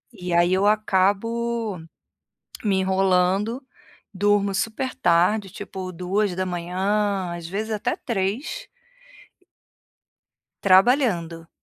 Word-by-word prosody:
e 180 -3 -6
aí 175 +1 +3
eu 190 +2 +2
acabo 215 +1 0 0.9
me 200 -2 +2
enrolando, 190 +5 +1 0.5
durmo 205 0 +2
super 225 +6 -2
tarde, 195 -1 +2
tipo 185 -1 -7
2:00, 185 +1 -1
às 170 -1 -7
vezes 215 +5 -4
até 210 -1 -1
3:00. 235 - -3 1.9
Trabalhando. 185 - +3
195 Hz, 85 wpm, -23 LUFS, 180-215 Hz, 1.9 s, aí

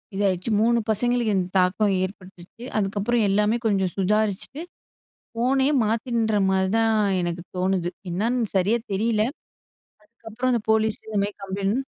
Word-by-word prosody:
இதாயிடுச்சு. 195 +1 0
3 235 +1 +3
பசங்களுக்கு 235 0 +1
இந்த 180 -1 0
தாக்கம் 190 +2 +2
ஏற்பட்டுச்சு. 185 +3 -9
அதுக்கப்புறம், 210 +3 0
எல்லாமே 210 +3 +2
கொஞ்சம் 195 -4 +1
சுதாரிச்சுட்டு, 210 - 0 0.7
ஃபோனே 265 +4 +2 0.2
மாத்தின்ற 225 0 0
மாரி 190 0 +1
தான், 225 0 +3 0.3
எனக்கு 175 0 -3
தோணுது. 185 -1 0 0.2
என்னான்னு 225 +5 0
சரியா 205 +6 +2
தெரியல. 215 +1 +1 0.8
அதுக்கப்புறம் 230 +3 -4
அந்த 235 - +1
போலீஸு 220 0 +2
இந்த 210 -2 0
மாரி 205 - -6
கம்ப்ளைண்ட் 200 +7 -2
210 Hz, 125 wpm, -24 LUFS, 190-230 Hz, 0.8 s, 3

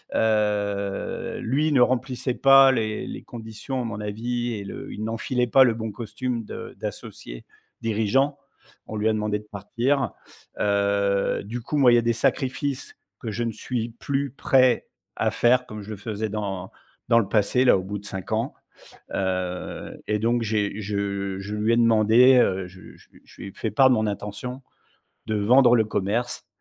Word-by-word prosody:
heu, 105 -2 0
lui 150 +6 +1
ne 135 - +4
remplissait 125 +1 +1
pas 135 0 +7
les 110 -3 -2
les - - -7
conditions, 115 +3 -6
à - - -4
mon 105 -2 -5
avis 120 +3 -3
et 100 - -5
le - - -8
il 110 - -6
n'enfilait 125 +2 -1
pas 130 +3 +6
le 120 - +2
bon 110 -1 -4
costume 115 +2 -4
de - - -8
d'associé - - -8 0.4
dirigeant. 115 +6 +1 0.5
On 110 - -5
lui 105 +1 0
a - - +2
demandé 105 -1 -1
de 105 - -16
partir. 120 +7 -1 0.5
Heu, 100 -1 +1
du 120 +3 -5
coup, 145 +6 -3
moi, 130 -3 +6
il - - +7
y - - +5
a - - +1
des 115 0 +1
sacrifices 135 +3 -1 0.2
que 110 - -5
je 115 +3 -2
ne 115 - -1
suis 115 +1 -3
plus 140 -2 -2
prêt 130 -2 +3 0.3
à - - +1
faire, 125 +1 +3
comme 105 -1 -7
je 105 - -9
le 105 - -5
faisais 110 +1 -4
dans 100 -3 -4 0.4
dans 115 - +6
le 110 - -1
passé, 110 +4 +2
là, 125 - +6
au 95 - -4
bout 100 +2 -5
de 100 - -15
5 95 -2 -7
ans. - - -1 0.6
Heu 90 -1 -3
et 105 0 0
donc, 115 +2 +1
j'ai 105 -1 -1
je 100 -1 -2
je 100 +2 -6
lui 110 +2 +1
ai - - +3
demandé, 115 +3 +6
heu, 95 -6 +2
je 90 +1 -14
je - - -22 0.2
je - - -15
lui - - -6
ai - - -14
fait 110 - -3
part 130 +5 +5
de 125 - +5
mon 110 0 0
intention 105 +6 -5 0.7
de 110 - -1
vendre 120 +4 +5
le 110 - +3
commerce, 110 +4 -2
110 Hz, 185 wpm, -24 LUFS, 100-125 Hz, 0.7 s, pas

